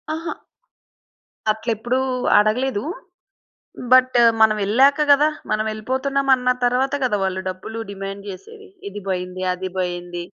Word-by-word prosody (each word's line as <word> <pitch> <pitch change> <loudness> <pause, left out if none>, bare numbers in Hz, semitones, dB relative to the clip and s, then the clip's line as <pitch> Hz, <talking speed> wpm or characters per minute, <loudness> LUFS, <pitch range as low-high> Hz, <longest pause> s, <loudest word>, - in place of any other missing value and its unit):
అహా! 330 +1 -4 1.2
అట్ళెప్పుడు 225 +3 -2 0.4
అడగలేదు. 215 +1 0 1.1
బట్, 255 -1 +5 0.2
మనమెళ్ళాక 220 +8 +4
కదా. 295 +2 +5 0.2
మనం 215 0 0
యేళ్ళిపోతున్నామన్న 260 +3 0 0.2
తరువాత 255 +3 +1
కదా, 210 -5 0
వాళ్ళు 190 0 -2
డబ్బులు 220 +5 -7
డిమాండ్ 195 0 -7
చేసేది. 425 - -11 0.2
ఇది 205 +1 -8
పోయింది. 185 0 -3
అది 185 +1 -5
పోయింది. 175 -1 -4
220 Hz, 105 wpm, -21 LUFS, 195-260 Hz, 1.2 s, బట్